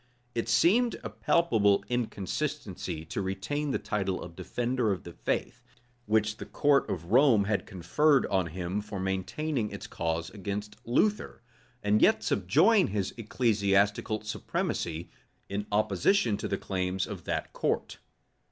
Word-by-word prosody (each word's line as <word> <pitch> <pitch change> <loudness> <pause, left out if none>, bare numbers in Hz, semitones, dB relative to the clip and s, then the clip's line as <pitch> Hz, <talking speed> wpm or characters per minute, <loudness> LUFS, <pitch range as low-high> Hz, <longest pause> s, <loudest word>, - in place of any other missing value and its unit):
It 115 -1 -2
seemed 215 - +4
a - - -5
palpable 110 -13 +2
inconsistency 110 - -3
to 80 - -3
retain 95 +11 -2
the - - +1
title 95 -3 -2
of 85 -1 -9
defender 120 +5 -1
of 95 - -3
the 85 - -9
faith, - - -2 0.5
which 110 0 +2
the - - -7
court 145 -1 +2
of 85 0 -4
Rome 125 -4 +6
had 100 0 -1
conferred 130 - +2
on 95 -3 +1
him 90 +4 -3
for 105 -2 -6
maintaining 105 +7 -2
its - - -7
cause 85 +1 -3
against 100 +1 -5
Luther; 205 - +1 0.4
and 105 +1 +3
yet 110 - +4
subjoin 155 - +4
his 100 -2 -2
ecclesiastical 105 -2 +1
supremacy, 85 -5 -3 0.4
in 100 +1 -3
opposition 105 - +2
to 100 - -4
the 100 - -1
claims 95 -1 -2
of - - -8
that - - -3
court. - - -1
105 Hz, 140 wpm, -29 LUFS, 95-125 Hz, 0.5 s, Rome